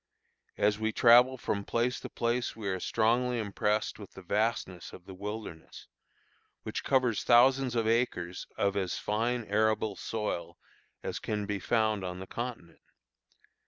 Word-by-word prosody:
As 105 +1 +2
we 110 0 0
travel 125 +3 +6
from 100 -4 -2
place 120 +4 0
to - - -8
place 120 +1 -1
we 110 -3 -6
are 95 -1 -1
strongly 120 +4 +1
impressed 105 0 -1
with 100 - -11
the 95 - -11
vastness 100 -3 -1
of 90 - -12
the 95 - -9
wilderness, 100 -4 -7 0.8
which - - -4
covers 130 -5 +2
thousands 130 +1 +5
of 115 -1 +1
acres 105 -7 0
of 100 0 +1
as 95 -3 -1
fine 115 +3 -1
arable 110 0 +1
soil 105 -6 -4 0.5
as - - -3
can 105 -1 -2
be 100 -1 -2
found 110 -3 +1
on 90 -1 -4
the 95 - -6
continent. 115 -8 -6
110 Hz, 150 wpm, -30 LUFS, 100-120 Hz, 0.8 s, travel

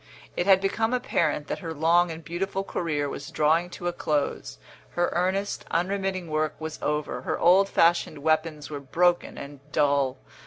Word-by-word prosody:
It 175 - -1
had 190 -1 +6
become 225 +5 0
apparent 245 -10 0
that - - -4
her 165 -3 -6
long 170 +3 +3
and 165 0 -7
beautiful 195 +4 -2
career 155 -6 -2
was 140 - -6
drawing 160 +3 +2
to 175 0 -6
a 175 - -1
close, 145 - -2 0.4
her 175 0 +1
earnest, 190 +3 -1
unremitting 190 +1 -1
work 155 0 -1
was 160 -1 -6
over, 150 0 -2
her - - -2
old 190 +3 +5
fashioned 170 -3 +2
weapons 155 -1 0
were 145 - -4
broken 175 +6 +1
and 140 0 -8
dull. 140 -3 +2
165 Hz, 165 wpm, -26 LUFS, 150-180 Hz, 0.4 s, had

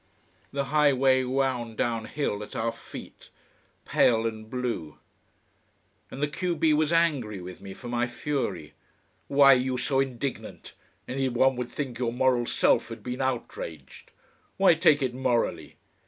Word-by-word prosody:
The 140 0 -1
high 150 -2 +5
way 130 0 +3
wound 125 -3 -1
down 115 -2 -1
hill 125 -8 -2
at 105 - -9
our 115 +1 0
feet, 115 - -12 0.6
pale 115 -1 +3
and 110 -1 -4
blue. 120 - -4 1.1
And 140 - -5
the - - +3
q 175 +4 -2
b 155 0 +3
was 155 +1 +2
angry 145 - +1
with 90 0 -9
me 95 -1 -9
for 125 - -10
my 120 0 0
fury. 130 - -3 0.5
"Why 140 -1 +7
are - - +4
you 130 0 -1
so 135 +2 0
indignant! 135 0 -4 0.3
Anyone 130 0 +1
would 125 -1 -3
think 135 -5 -5
your 120 -2 0
moral 125 -1 +2
self - - +2
had - - -9
been 125 +1 -4
outraged! 85 - -5 0.5
Why 190 -2 +6
take 155 -4 +4
it 130 -2 -1
morally? 120 - -1
130 Hz, 155 wpm, -27 LUFS, 115-140 Hz, 1.1 s, Why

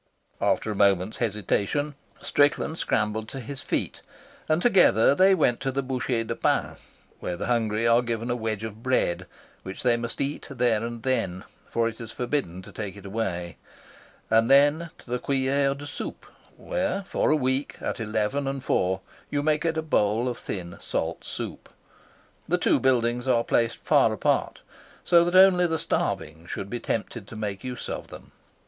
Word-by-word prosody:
After 110 - +1
a - - -3
moment's 100 0 +2
hesitation, 110 +6 -1 0.3
Strickland 145 +3 +2
scrambled 110 +1 0
to 135 - -6
his 130 +2 -5
feet, - - -2 0.5
and 155 +1 +3
together 180 - +5
they 190 +5 +5
went 125 -8 +2
to 135 -1 -1
the 135 +1 -1
Bouchee 125 -2 -1
de 115 +1 -4
Pain, - - 0 0.4
where 90 - -4
the - - -3
hungry 115 -2 +1
are 115 +1 +5
given 115 0 -2
a - - +1
wedge 110 -2 -3
of 110 0 -7
bread, 90 -8 0 0.3
which 95 0 -7
they 120 -2 +3
must 115 0 -5
eat 140 +1 -2
there 120 -5 +1
and 115 -1 -5
then, 95 -8 -1 0.3
for 115 0 +1
it 115 0 -6
is 115 -1 -7
forbidden 120 - -2
to - - -12
take 100 -2 -6
it 100 - -12
away; 95 -5 -3 0.7
and 115 +1 +4
then 145 +4 +5
to - - -18
the 125 - 0
Cuillere 135 +1 +1
de 145 +1 -9
Soupe, - - -6 0.3
where - - -2
for - - 0
a 155 - +5
week, 130 0 -1
at - - -3
eleven 110 +5 -1
and 135 -1 -3
four, 95 -5 +1 0.3
you 145 0 -1
may 155 0 +2
get 165 0 -1
a 160 - 0
bowl 115 -5 +1
of 125 - -3
thin, 85 -3 -6
salt - - -3
soup. - - -6 0.8
The - - +2
two - - +3
buildings 120 -1 +1
are 120 -2 +3
placed 115 -1 +1
far - - +3
apart, - - 0 0.4
so 170 -1 +6
that 175 +1 -1
only 185 -1 +7
the 160 -1 0
starving 80 - -2
should 100 +3 -5
be 120 - -2
tempted 115 -2 -3
to 115 - -10
make 105 -2 -4
use 125 -2 -5
of - - -5
them. - - -12
120 Hz, 180 wpm, -26 LUFS, 105-140 Hz, 0.8 s, only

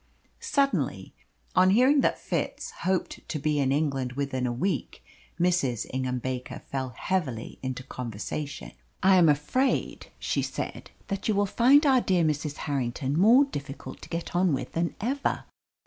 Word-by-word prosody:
Suddenly, 285 -13 0 0.4
on 185 0 +6
hearing 255 +8 +5
that - - +2
Fitz - - -3
hoped 185 0 -2
to 155 - -2
be 150 0 0
in 135 -1 +2
England 135 -4 0
within 130 -2 -1
a - - -1
week, 175 +11 -2 0.4
Mrs. 170 -10 +1
Ingham 130 -1 -1
Baker 125 0 -5
fell 130 -1 -2
heavily 140 -12 -2
into 130 -1 -4
conversation. 125 +5 -5 0.3
"I 190 0 +6
am 170 -3 +6
afraid," 150 - 0
she - - -1
said, - - -5 0.2
"that 195 0 -3
you 215 - +2
will 205 +1 +3
find 260 +9 +5
our 265 -3 +5
dear 185 -6 +2
Mrs. 150 -1 -1
Harrington 135 -1 -1
more 230 - +6
difficult 140 - -7
to - - -11
get 170 +1 -4
on 175 -4 +3
with - - -5
than 170 0 -1
ever. 270 +6 -1
155 Hz, 155 wpm, -27 LUFS, 130-195 Hz, 0.4 s, on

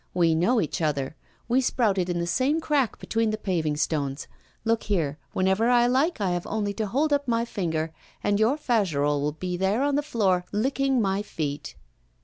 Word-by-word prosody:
We 170 -2 +4
know 180 +10 +3
each 165 -2 -2
other; 145 -2 -1 0.3
we 250 +3 +3
sprouted 200 -8 +1
in 175 - -1
the 170 - -1
same 265 - +1
crack 290 -7 0
between 225 0 0
the 215 - -1
paving 165 -8 -1
stones. 145 -2 -1 0.4
Look 225 0 +2
here, 155 -7 0
whenever 190 +5 +2
I 240 -1 +5
like, 265 +7 +2
I 195 -3 0
have 175 -1 -2
only 205 -1 -1
to 215 0 -2
hold 290 +8 +1
up 285 -1 0
my 230 -1 +1
finger, 165 -7 -2 0.3
and 205 0 +1
your 230 +7 +3
Fagerolles 155 - +1
will 150 +1 -1
be 180 +3 -4
there 195 +7 +1
on 285 0 +1
the 290 - +2
floor, 200 -11 +1
licking 265 +3 +1
my 195 0 0
feet. 150 -8 -4
205 Hz, 190 wpm, -26 LUFS, 165-240 Hz, 0.4 s, I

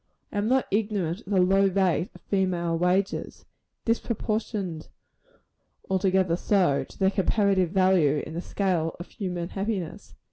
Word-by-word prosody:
I 205 - -1
am 205 - 0
not 260 +2 +3
ignorant 200 -4 0
of - - -18
the 195 - +3
low 195 +2 +4
rate 190 0 +1
of - - -14
female 180 -4 0
wages 180 +3 -1 0.4
disproportioned, 215 -7 -2 1.0
altogether 190 -2 +2
so, 180 -8 +2
to - - -17
their 190 0 +3
comparative 195 -2 +2
value 180 -6 +3
in - - -8
the 170 - -3
scale 180 -5 -1
of 175 - -8
human 180 -3 -4
happiness. 195 -4 -4
190 Hz, 140 wpm, -26 LUFS, 175-200 Hz, 1.0 s, low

